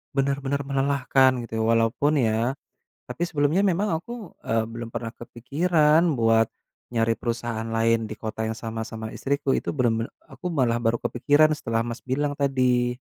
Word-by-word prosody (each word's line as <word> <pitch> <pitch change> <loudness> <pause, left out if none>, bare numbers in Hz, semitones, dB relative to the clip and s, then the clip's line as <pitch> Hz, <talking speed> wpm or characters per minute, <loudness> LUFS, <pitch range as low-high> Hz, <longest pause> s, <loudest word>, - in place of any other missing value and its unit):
benar-benar 140 0 0
melelahkan 135 -1 +3 0.2
gitu 110 -1 -3
walaupun 115 +6 +2
ya 115 +2 +1 0.6
tapi - - -5
sebelumnya 155 +3 +2
memang 195 +2 +1
aku, 215 +3 -8
eee, 115 0 0
belum 115 0 -6
pernah 115 -1 -4
kepikiran 150 +7 +2 0.2
buat 115 -1 +4 0.4
nyari 115 -1 +1
perusahaan 115 -1 -3
lain 115 0 +1
di - - -4
kota 110 +1 -4
yang 110 - -2
sama-sama 110 -1 -5
istriku 140 +2 -2
itu - - -2
bener-bener 115 -3 0 0.2
aku - - -9
malah 125 -6 +2
baru 115 0 +1
kepikiran 145 +5 +3
setelah 115 -5 -1
Mas 120 +1 -5
bilang 145 +3 -1
tadi. 125 -3 +2
120 Hz, 145 wpm, -25 LUFS, 115-140 Hz, 0.6 s, buat